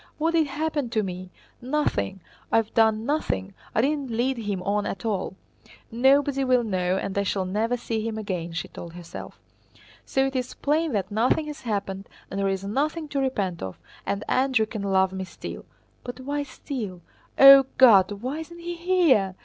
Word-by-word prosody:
What 320 Hz, +2 st, +1 dB
did 320 Hz, -2 st, +3 dB
happen 295 Hz, -2 st, -2 dB
to 220 Hz, -2 st, 0 dB
me? 185 Hz, -1 st, -6 dB, 0.3 s
Nothing! 245 Hz, -, -1 dB, 0.3 s
I -, -, +4 dB
have 225 Hz, -1 st, 0 dB
done 220 Hz, -1 st, +3 dB
nothing, 165 Hz, -, -1 dB, 0.2 s
I -, -, +4 dB
didn't 280 Hz, 0 st, 0 dB
lead 240 Hz, +4 st, 0 dB
him 205 Hz, -4 st, -3 dB
on 205 Hz, +1 st, 0 dB
at 195 Hz, -, -5 dB
all. 195 Hz, -4 st, -2 dB, 0.6 s
Nobody 275 Hz, +3 st, +3 dB
will 255 Hz, -2 st, +3 dB
know 185 Hz, -3 st, 0 dB
and 195 Hz, -, -3 dB
I 200 Hz, -, +2 dB
shall 195 Hz, -1 st, -1 dB
never 220 Hz, +6 st, 0 dB
see 225 Hz, -2 st, -3 dB
him 220 Hz, 0 st, -3 dB
again," 180 Hz, -5 st, -4 dB
she 165 Hz, -1 st, -4 dB
told 170 Hz, -1 st, -10 dB
herself. 175 Hz, -1 st, -9 dB, 0.6 s
"So 270 Hz, 0 st, +1 dB
it 270 Hz, 0 st, -3 dB
is 255 Hz, -1 st, -2 dB
plain 305 Hz, 0 st, 0 dB
that 200 Hz, -1 st, -1 dB
nothing 240 Hz, +8 st, +2 dB
has 300 Hz, -1 st, -7 dB
happened 200 Hz, -4 st, -3 dB, 0.2 s
and 195 Hz, -, -3 dB
there 195 Hz, 0 st, +1 dB
is 195 Hz, 0 st, -2 dB
nothing 300 Hz, +9 st, -1 dB
to 280 Hz, -, -1 dB
repent 200 Hz, -10 st, -1 dB
of, 95 Hz, -1 st, -6 dB, 0.2 s
and 200 Hz, -, -2 dB
Andrew 260 Hz, -4 st, +2 dB
can 215 Hz, -1 st, -6 dB
love 190 Hz, -1 st, +2 dB
me 190 Hz, 0 st, -3 dB
still. 185 Hz, -, -8 dB, 0.4 s
But 245 Hz, +1 st, -7 dB
why 285 Hz, +2 st, -2 dB
'still?' 250 Hz, -, -6 dB, 0.4 s
O 275 Hz, 0 st, +10 dB
God, 205 Hz, -7 st, +7 dB
why 250 Hz, +9 st, -4 dB
isn't 340 Hz, +2 st, -9 dB
he 345 Hz, 0 st, -5 dB
here?" 330 Hz, -, +3 dB
225 Hz, 185 wpm, -25 LUFS, 195-275 Hz, 0.6 s, O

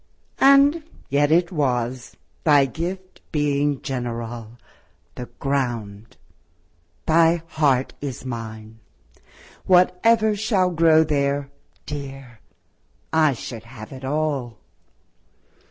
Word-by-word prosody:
And 280 Hz, +4 st, +5 dB, 0.3 s
yet 145 Hz, +2 st, +2 dB
it 170 Hz, +2 st, +3 dB
was, 125 Hz, -5 st, -2 dB, 0.3 s
thy 145 Hz, -3 st, +5 dB
gift 180 Hz, +7 st, -6 dB
being 145 Hz, -2 st, 0 dB
general, 120 Hz, -2 st, -5 dB, 0.6 s
The 125 Hz, -, -7 dB
ground; 115 Hz, -6 st, -3 dB, 0.9 s
thy 165 Hz, +1 st, +3 dB
heart 145 Hz, -6 st, +1 dB
is 135 Hz, -3 st, -6 dB
mine: 110 Hz, -2 st, -7 dB, 0.9 s
what 180 Hz, 0 st, +4 dB
ever 220 Hz, -2 st, +4 dB
shall 200 Hz, -3 st, +1 dB
Grow 160 Hz, -1 st, +5 dB
there, 140 Hz, -2 st, -1 dB, 0.3 s
dear, 135 Hz, -5 st, -8 dB, 0.7 s
I 155 Hz, -3 st, +4 dB
should 115 Hz, -2 st, -8 dB
have 115 Hz, -2 st, -11 dB
it 135 Hz, -1 st, -10 dB
all. 140 Hz, -4 st, -2 dB
140 Hz, 95 wpm, -22 LUFS, 120-165 Hz, 0.9 s, And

